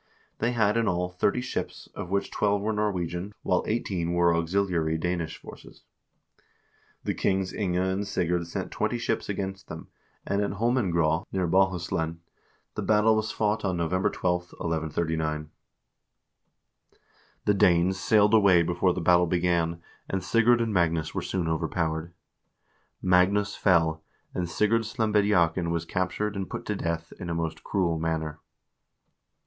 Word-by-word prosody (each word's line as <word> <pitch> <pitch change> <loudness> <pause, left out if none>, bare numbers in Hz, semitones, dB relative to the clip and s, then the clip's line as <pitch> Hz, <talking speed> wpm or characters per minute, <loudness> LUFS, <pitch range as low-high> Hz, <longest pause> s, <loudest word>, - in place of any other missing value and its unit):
They 120 +2 +1
had 110 -2 +2
in 115 -1 +1
all 90 -1 0
thirty 100 +6 0
ships, 130 - -5
of - - -6
which 100 +1 -1
twelve 100 -1 +1
were 110 +1 0
Norwegian, 100 -2 -2
while 90 - +1
eighteen 95 -7 -1
were 85 -1 +3
auxiliary 85 -2 0
Danish 85 -1 -2
forces. - - -13 1.2
The - - -1
kings 95 -1 0
Inge 95 -4 -1
and 95 +2 0
Sigurd 90 -3 -1
sent 85 - -4
twenty - - -1
ships - - -2
against 95 -1 -4
them, - - -9 0.4
and 100 +1 0
at 100 - -1
Holmengraa, 95 -8 +1
near 95 -2 0
Bohuslen, 85 -3 +1 0.6
the - - -4
battle 110 +1 +4
was 110 0 -1
fought 105 0 0
on 95 -3 0
November 90 +3 +1
12, 90 -1 -2
1139. 80 -2 -2 1.9
The 105 - +4
Danes 90 0 +3
sailed 105 +2 +4
away 100 -6 +6
before 90 +2 +1
the 90 - -2
battle 90 +1 +4
began, 85 -1 0 0.3
and 95 -2 -2
Sigurd 115 +4 +3
and 115 -2 -1
Magnus 85 -3 +1
were - - -2
soon 90 -3 -2
overpowered. 80 +1 -1 0.9
Magnus 95 +3 +3
fell, 80 -4 +2 0.3
and 90 -2 -2
Sigurd 105 +5 +2
Slembediakn 105 -7 +1
was 85 0 -1
captured 95 +4 -2
and 95 -1 -4
put - - -6
to 105 - -2
death 85 -2 -3
in 90 - -5
a 85 - -2
most 80 -1 -3
cruel 85 -5 0
manner. 80 -1 -2
90 Hz, 145 wpm, -27 LUFS, 85-100 Hz, 1.9 s, away